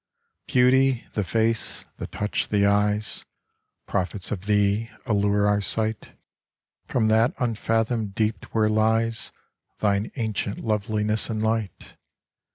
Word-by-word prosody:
Beauty, 130 Hz, 0 st, +3 dB
the 105 Hz, -, 0 dB
face, 110 Hz, +4 st, 0 dB
the -, -, -5 dB
touch, 105 Hz, 0 st, -2 dB
the 100 Hz, -1 st, +2 dB
eyes, 105 Hz, +1 st, +1 dB, 0.6 s
Prophets 95 Hz, 0 st, -2 dB
of 95 Hz, -2 st, -4 dB
thee, 105 Hz, +2 st, +2 dB, 0.2 s
allure 100 Hz, -1 st, +2 dB
our 105 Hz, 0 st, +2 dB
sight 110 Hz, +2 st, -1 dB, 0.7 s
From 115 Hz, -3 st, +1 dB
that 115 Hz, +7 st, +3 dB
unfathomed 115 Hz, -3 st, -1 dB
deep 110 Hz, 0 st, -1 dB
where 110 Hz, -1 st, +1 dB
lies 110 Hz, +1 st, +1 dB, 0.5 s
Thine 100 Hz, 0 st, 0 dB
ancient 110 Hz, -4 st, -2 dB
loveliness 105 Hz, 0 st, 0 dB
and 110 Hz, -1 st, -2 dB
light. 110 Hz, -2 st, -2 dB
110 Hz, 115 wpm, -25 LUFS, 105-115 Hz, 0.7 s, Beauty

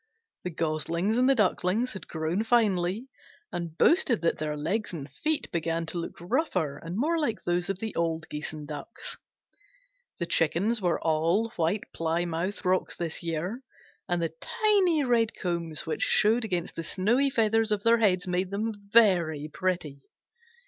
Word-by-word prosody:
The 180 Hz, -, -2 dB
Goslings 170 Hz, +6 st, 0 dB
and 255 Hz, +1 st, +4 dB
the 275 Hz, -, +5 dB
Ducklings 210 Hz, +2 st, +1 dB
had 190 Hz, -5 st, -9 dB
grown 160 Hz, +4 st, -1 dB
finely, 220 Hz, -1 st, +1 dB, 0.4 s
and 170 Hz, -2 st, -5 dB
boasted 290 Hz, -, +3 dB
that 165 Hz, -, +1 dB
their 150 Hz, -1 st, -2 dB
legs 190 Hz, +8 st, -2 dB
and 145 Hz, -5 st, -5 dB
feet 305 Hz, -, -1 dB
began 165 Hz, 0 st, -1 dB
to 170 Hz, +1 st, -4 dB
look 170 Hz, -, -5 dB
rougher 175 Hz, -, -1 dB
and 170 Hz, +3 st, -5 dB
more 325 Hz, +7 st, +1 dB
like 235 Hz, -8 st, -1 dB
those 175 Hz, +1 st, 0 dB
of 195 Hz, -, -1 dB
the 220 Hz, +2 st, -4 dB
old 165 Hz, -1 st, -1 dB
Geese 150 Hz, 0 st, -5 dB
and 150 Hz, -2 st, -8 dB
Ducks. 150 Hz, +8 st, -6 dB, 1.0 s
The 170 Hz, -, -2 dB
Chickens 180 Hz, +8 st, +1 dB
were 175 Hz, -2 st, +1 dB
all 165 Hz, +8 st, +1 dB
White 175 Hz, +2 st, 0 dB
Plymouth 170 Hz, +4 st, -2 dB
Rocks 185 Hz, 0 st, +1 dB
this 165 Hz, -2 st, -4 dB
year, 170 Hz, +8 st, -3 dB, 0.5 s
and 175 Hz, 0 st, +2 dB
the 165 Hz, -1 st, -2 dB
tiny 405 Hz, -9 st, +2 dB
red 235 Hz, -3 st, +2 dB
combs 170 Hz, -4 st, -2 dB
which 160 Hz, -, -3 dB
showed 225 Hz, +3 st, +3 dB
against 180 Hz, -6 st, -2 dB
the 165 Hz, -, -4 dB
snowy 220 Hz, -, +2 dB
feathers 225 Hz, -2 st, +2 dB
of 205 Hz, -1 st, 0 dB
their 230 Hz, 0 st, +5 dB
heads 185 Hz, -4 st, +3 dB
made 180 Hz, 0 st, -1 dB
them 215 Hz, +3 st, -2 dB, 0.2 s
very 170 Hz, -9 st, +4 dB
pretty. 170 Hz, -7 st, -2 dB
180 Hz, 165 wpm, -28 LUFS, 165-225 Hz, 1.0 s, the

